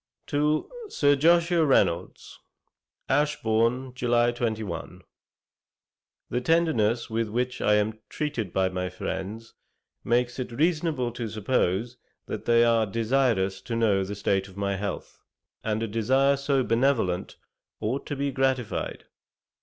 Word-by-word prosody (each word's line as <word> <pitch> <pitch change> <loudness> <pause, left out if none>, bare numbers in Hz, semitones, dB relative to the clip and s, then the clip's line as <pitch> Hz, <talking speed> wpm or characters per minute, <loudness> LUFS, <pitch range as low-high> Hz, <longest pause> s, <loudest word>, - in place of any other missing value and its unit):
To 150 +1 +1 0.2
SIR 145 - +3
JOSHUA 170 +2 +4
REYNOLDS: 95 - 0 0.7
Ashbourne, 125 -3 +1
July 120 -1 +2
21. 110 -7 -4 1.3
'The 125 - 0
tenderness 125 -9 +1
with 115 -1 -1
which 125 +3 -2
I 105 - +4
am 105 +1 0
treated 145 - -3
by 95 +1 +1
my 90 0 -3
friends, 110 +6 -5 0.5
makes 120 +2 0
it 125 - -4
reasonable 150 -2 0
to 115 -1 -5
suppose 110 +1 0 0.3
that - - -6
they 120 0 +5
are 115 -2 +3
desirous 110 -4 +1
to 115 - -4
know 105 -4 +2
the 100 +2 -5
state 95 -1 0
of 95 0 -15
my 100 -1 -1
health, 100 -1 -5 0.4
and 110 0 -1
a - - -1
desire 130 +6 +2
so 140 -1 +1
benevolent 115 -7 +1 0.4
ought 125 +6 -2
to 145 - -3
be 140 0 -1
gratified. 130 -3 -1
115 Hz, 130 wpm, -26 LUFS, 105-135 Hz, 1.3 s, they